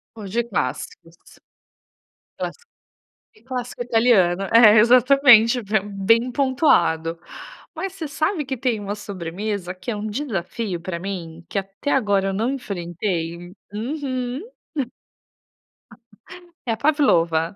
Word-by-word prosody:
Vou 215 Hz, -2 st, -8 dB
de 235 Hz, +5 st, 0 dB
clássicos. 165 Hz, -, -4 dB, 1.2 s
Clássico, 475 Hz, 0 st, -6 dB, 0.6 s
e 215 Hz, -, -23 dB
clássico 245 Hz, -1 st, -5 dB
italiano, 225 Hz, -7 st, +3 dB
é 225 Hz, -2 st, +8 dB
exatamente, 245 Hz, 0 st, +6 dB, 0.2 s
bem 215 Hz, +5 st, +2 dB
pontuado. 175 Hz, -, +2 dB, 0.6 s
Mas 385 Hz, -1 st, -4 dB
você 330 Hz, -6 st, -5 dB
sabe 310 Hz, +3 st, -1 dB
que 265 Hz, 0 st, -4 dB
tem 240 Hz, -3 st, -1 dB
uma 205 Hz, 0 st, -4 dB
sobremesa 195 Hz, -1 st, -5 dB
que 185 Hz, +5 st, -6 dB
é 220 Hz, -, -3 dB
um 210 Hz, +1 st, -4 dB
desafio 205 Hz, -, -3 dB
para 175 Hz, 0 st, -4 dB
mim, 170 Hz, -3 st, -6 dB
que -, -, -2 dB
até 195 Hz, +9 st, -4 dB
agora 205 Hz, -6 st, +2 dB
eu 195 Hz, -, -2 dB
não 225 Hz, +6 st, 0 dB
enfrentei? 175 Hz, -7 st, -4 dB, 0.2 s
Uhum. 255 Hz, +2 st, -3 dB, 2.3 s
É -, -, +3 dB
a -, -, -8 dB
Pavlova. 170 Hz, -, +3 dB
215 Hz, 115 wpm, -22 LUFS, 185-250 Hz, 2.3 s, é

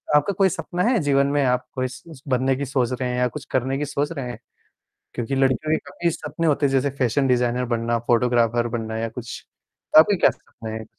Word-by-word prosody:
आपका 150 Hz, +7 st, +3 dB
कोई 195 Hz, -1 st, +4 dB
सपना 180 Hz, 0 st, -3 dB
है 235 Hz, 0 st, +3 dB
जीवन 140 Hz, -1 st, +3 dB
में 145 Hz, 0 st, +1 dB
आप 125 Hz, 0 st, +1 dB
कोई 130 Hz, -1 st, 0 dB
स 130 Hz, +2 st, -12 dB
बनने 130 Hz, 0 st, +1 dB
की 140 Hz, -, -3 dB
सोच 130 Hz, -2 st, 0 dB
रहे 125 Hz, 0 st, -2 dB
हैं 125 Hz, -, -2 dB
या 125 Hz, 0 st, +2 dB
कुछ 140 Hz, +2 st, -8 dB
करने 130 Hz, +1 st, 0 dB
की 150 Hz, -, -2 dB
सोच 145 Hz, +1 st, -2 dB
रहे 135 Hz, -6 st, -5 dB
हैं? 120 Hz, -, -7 dB, 0.8 s
क्योंकि 120 Hz, +2 st, -3 dB
लड़कियों 135 Hz, +3 st, +1 dB
के -, -, +4 dB
काफ़ी 170 Hz, -1 st, -1 dB
सपने 165 Hz, +1 st, -3 dB
होते 145 Hz, -1 st, +2 dB
हैं -, -, 0 dB
जैसे 135 Hz, +1 st, +2 dB
फैशन 130 Hz, +2 st, +1 dB
डिज़ाइनर 125 Hz, 0 st, +1 dB
बनना, 115 Hz, 0 st, 0 dB
फोटोग्राफर 120 Hz, 0 st, +2 dB
बनना 110 Hz, 0 st, -5 dB
या 115 Hz, -, -2 dB
कुछ। 115 Hz, 0 st, -8 dB, 0.6 s
आपका 195 Hz, +5 st, +6 dB
क्या -, -, +4 dB
सपना 115 Hz, -2 st, -11 dB
है? 110 Hz, 0 st, -5 dB
130 Hz, 220 wpm, -23 LUFS, 120-145 Hz, 0.8 s, आपका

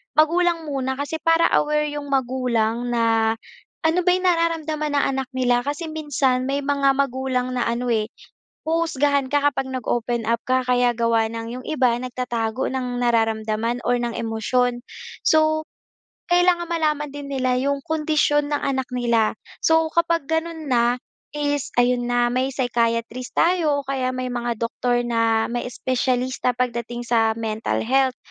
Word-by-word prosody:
Magulang 335 Hz, +2 st, +3 dB
muna 265 Hz, -2 st, -2 dB
kasi 285 Hz, +4 st, -4 dB
para 330 Hz, +1 st, +3 dB
aware 300 Hz, 0 st, 0 dB
'yong 290 Hz, -1 st, -5 dB
magulang 245 Hz, -3 st, 0 dB
na 225 Hz, -1 st, +2 dB, 0.5 s
ano 320 Hz, +3 st, +3 dB
ba -, -, +4 dB
'yong 370 Hz, 0 st, -2 dB
nararamdaman 320 Hz, -3 st, 0 dB
ng 285 Hz, -, +3 dB
anak 265 Hz, -1 st, -3 dB
nila. 245 Hz, -1 st, +2 dB
Kasi 295 Hz, +3 st, -3 dB
minsan, 275 Hz, -5 st, 0 dB
may 280 Hz, +1 st, -1 dB
mga 275 Hz, -1 st, +2 dB
magulang 260 Hz, -2 st, -1 dB
na 245 Hz, -, 0 dB
ano 240 Hz, +1 st, -1 dB
eh, 215 Hz, -2 st, +1 dB, 0.6 s
huhusgahan 290 Hz, -4 st, +1 dB
ka 290 Hz, 0 st, +3 dB
kapag 270 Hz, -1 st, -3 dB
nag-open 240 Hz, -1 st, -1 dB
up 230 Hz, 0 st, +1 dB
ka 255 Hz, 0 st, +2 dB
kaya 245 Hz, -1 st, +3 dB
gawa 230 Hz, -1 st, +2 dB
ng 230 Hz, +1 st, -5 dB
'yong 255 Hz, -, -12 dB
iba 255 Hz, -6 st, +2 dB
nagtatago 240 Hz, -2 st, -2 dB
ng 250 Hz, -2 st, -3 dB
nararamdaman 225 Hz, 0 st, 0 dB
or 245 Hz, 0 st, +2 dB
ng 240 Hz, -1 st, -2 dB
emosyon. 240 Hz, +2 st, 0 dB, 0.4 s
So, 310 Hz, 0 st, +3 dB, 0.7 s
kailangan 350 Hz, -1 st, +3 dB
malaman 305 Hz, -3 st, 0 dB
din 290 Hz, -1 st, -7 dB
nila 255 Hz, -2 st, +1 dB
'yong 280 Hz, +1 st, 0 dB
kondisyon 300 Hz, -2 st, +1 dB
ng 290 Hz, -, +1 dB
anak 265 Hz, -1 st, -1 dB
nila. 235 Hz, -3 st, +1 dB, 0.3 s
So, 320 Hz, 0 st, +4 dB
kapag 335 Hz, -3 st, +1 dB
gano'n 320 Hz, -1 st, -2 dB
na, 240 Hz, -1 st, +3 dB, 0.4 s
is 290 Hz, -2 st, -1 dB
ayon 245 Hz, 0 st, +2 dB
na 245 Hz, 0 st, +3 dB
may 260 Hz, +2 st, 0 dB
psychiatrist 235 Hz, -1 st, -1 dB
tayo 330 Hz, -4 st, +2 dB
o -, -, -33 dB
kaya 265 Hz, -2 st, -1 dB
may 255 Hz, 0 st, -3 dB
mga 240 Hz, -1 st, -2 dB
doktor 240 Hz, +1 st, 0 dB
na 230 Hz, -1 st, +1 dB
may 240 Hz, 0 st, -2 dB
espesyalista 255 Hz, 0 st, 0 dB
pagdating 240 Hz, -1 st, -2 dB
sa 225 Hz, -2 st, +3 dB
mental 220 Hz, 0 st, -2 dB
health. 260 Hz, +1 st, +2 dB
255 Hz, 155 wpm, -22 LUFS, 240-295 Hz, 0.7 s, ba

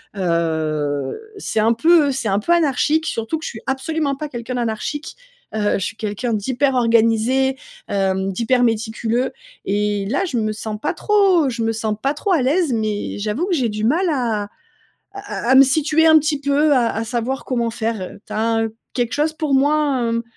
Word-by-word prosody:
heu, 155 Hz, -6 st, -1 dB, 0.2 s
c'est 220 Hz, -, -2 dB
un 225 Hz, +2 st, +3 dB
peu, 320 Hz, +5 st, +4 dB
heu, -, -, +1 dB
c'est 250 Hz, -5 st, -2 dB
un 195 Hz, +1 st, +2 dB
peu 340 Hz, +11 st, +1 dB
anarchique, 315 Hz, 0 st, +2 dB
surtout 230 Hz, +6 st, -2 dB
que 315 Hz, -, -11 dB
je -, -, -3 dB
suis 220 Hz, -, -8 dB
absolument 275 Hz, +2 st, -1 dB
pas 300 Hz, +2 st, -6 dB
quelqu'un 240 Hz, -1 st, -5 dB
d'anarchique. 245 Hz, +6 st, -3 dB, 0.4 s
Heu, 210 Hz, -1 st, 0 dB
je 195 Hz, -, -3 dB
suis 225 Hz, -, -5 dB
quelqu'un 220 Hz, +2 st, -3 dB
d'hyper 260 Hz, +6 st, 0 dB
organisé, 235 Hz, +3 st, +2 dB, 0.3 s
hem, 195 Hz, -1 st, 0 dB
d'hyper 240 Hz, +5 st, +1 dB
méticuleux. 225 Hz, +2 st, 0 dB, 0.3 s
Et 205 Hz, 0 st, 0 dB
là, 375 Hz, -, 0 dB
je 305 Hz, -10 st, -2 dB
me 215 Hz, -1 st, 0 dB
sens 215 Hz, 0 st, -5 dB
pas -, -, -1 dB
trop 390 Hz, -8 st, +3 dB
je 230 Hz, -2 st, -3 dB
me 225 Hz, 0 st, 0 dB
sens 220 Hz, -1 st, -2 dB
pas 275 Hz, +2 st, +1 dB
trop 380 Hz, +7 st, -2 dB
à 330 Hz, -, +3 dB
l'aise, 300 Hz, +3 st, +1 dB
mais 215 Hz, -2 st, -2 dB
j'avoue 215 Hz, -, -1 dB
que 380 Hz, -, 0 dB
j'ai 255 Hz, -6 st, +1 dB
du 210 Hz, 0 st, -4 dB
mal 325 Hz, +12 st, +2 dB
à 235 Hz, -8 st, 0 dB, 0.7 s
à 395 Hz, -10 st, -6 dB
à -, -, +3 dB
à -, -, +6 dB
me 265 Hz, -, +9 dB
situer 310 Hz, +4 st, +2 dB
un 315 Hz, 0 st, +8 dB
petit 300 Hz, -1 st, -1 dB
peu, 285 Hz, +2 st, +2 dB
à 240 Hz, -3 st, +3 dB
à 225 Hz, -, -2 dB
savoir 240 Hz, +4 st, -3 dB
comment 235 Hz, -3 st, -1 dB
faire 225 Hz, -1 st, -3 dB
heu, 185 Hz, -, -7 dB
tu -, -, -10 dB
as 215 Hz, -, -2 dB
un 225 Hz, 0 st, +1 dB
heu, 220 Hz, -1 st, -5 dB, 0.2 s
quelque 240 Hz, -2 st, -1 dB
chose 305 Hz, +2 st, +1 dB
pour 305 Hz, -3 st, -2 dB
moi, 285 Hz, 0 st, +2 dB
hem, 230 Hz, 0 st, -1 dB
240 Hz, 205 wpm, -20 LUFS, 220-290 Hz, 0.7 s, me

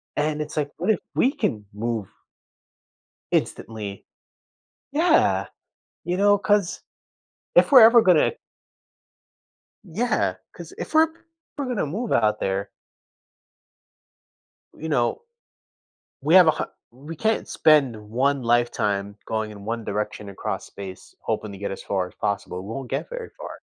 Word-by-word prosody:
and 150 Hz, 0 st, 0 dB
it's 150 Hz, 0 st, -6 dB
like, 145 Hz, -1 st, -1 dB
"What 180 Hz, +5 st, -2 dB
if -, -, +1 dB, 0.2 s
we 260 Hz, -, +3 dB
can 105 Hz, -, -2 dB
move" 110 Hz, -1 st, -3 dB, 1.3 s
"instantly?" 105 Hz, -3 st, -2 dB, 0.9 s
Yeah. 320 Hz, +5 st, +3 dB, 0.6 s
You 175 Hz, -, -1 dB
know? 205 Hz, +1 st, +5 dB
'Cause, 205 Hz, -2 st, +1 dB, 0.7 s
if -, -, +5 dB
we're 260 Hz, -5 st, +10 dB
ever 230 Hz, +2 st, +8 dB
gonna 180 Hz, -7 st, +4 dB, 1.5 s
Yeah, 215 Hz, +7 st, 0 dB, 0.2 s
'cause -, -, -10 dB
if -, -, -6 dB
we’re 315 Hz, +1 st, +6 dB, 0.5 s
we’re 285 Hz, -2 st, -2 dB
gonna 245 Hz, -9 st, -1 dB
move 210 Hz, +11 st, -3 dB
out 105 Hz, 0 st, +2 dB
there. 95 Hz, +1 st, -2 dB, 2.1 s
You 160 Hz, -, -6 dB
know, 125 Hz, -, +1 dB, 1.0 s
we 155 Hz, +6 st, +3 dB
have 180 Hz, -3 st, +9 dB
a -, -, +7 dB
har -, -, -4 dB, 0.2 s
We 145 Hz, +7 st, -9 dB
can’t 220 Hz, +4 st, 0 dB
spend 145 Hz, -7 st, +4 dB
1 135 Hz, +3 st, +1 dB
lifetime 105 Hz, -4 st, 0 dB
going 110 Hz, -1 st, -2 dB
in 100 Hz, -1 st, -11 dB
1 115 Hz, +1 st, -3 dB
direction 105 Hz, 0 st, -4 dB
across 100 Hz, -, -4 dB
space 95 Hz, -2 st, -10 dB
hoping 110 Hz, -, -2 dB
to 100 Hz, -, -9 dB
get 100 Hz, +1 st, -4 dB
as 95 Hz, -, -7 dB
far 95 Hz, -2 st, -1 dB
as -, -, -18 dB
possible, 100 Hz, -2 st, -3 dB
we -, -, -9 dB
won’t 130 Hz, 0 st, -6 dB
get -, -, -3 dB
very -, -, -6 dB
far. -, -, -8 dB
135 Hz, 140 wpm, -24 LUFS, -, 2.1 s, we're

